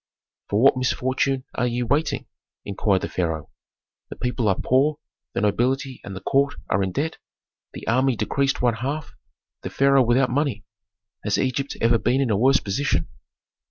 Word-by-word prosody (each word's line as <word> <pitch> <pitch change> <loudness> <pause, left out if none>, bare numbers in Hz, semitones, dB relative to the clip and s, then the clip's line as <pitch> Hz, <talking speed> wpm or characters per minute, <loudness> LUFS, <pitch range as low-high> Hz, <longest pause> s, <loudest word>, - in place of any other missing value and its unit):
"For 100 - +1
what 135 +2 +5
misfortune 130 +1 0
are 125 - 0
ye 120 +1 -1
waiting?" 145 +6 0 0.4
inquired 100 -1 0
the - - -1
pharaoh. 80 -4 -3 0.6
"The - - -7
people 125 -2 -1
are 95 - +2
poor, 140 +4 +2 0.4
the - - -1
nobility 130 +5 0
and 100 - -7
the 95 - -7
court 140 +6 +1 0.2
are 95 - +2
in 95 -1 -1
debt, 155 - -2 0.5
the - - -8
army 130 +2 +2
decreased 135 +6 0
one 120 -1 +3
half, 140 +6 -4 0.5
the - - -5
pharaoh 140 0 +4
without 125 +2 +2
money. 135 -6 -1 0.6
Has - - 0
Egypt 135 +1 -1
ever 115 0 +4
been 125 +6 +1
in 135 -4 +1
a - - +3
worse 135 +6 +4
position?" 135 +8 -1
125 Hz, 165 wpm, -23 LUFS, 110-135 Hz, 0.6 s, what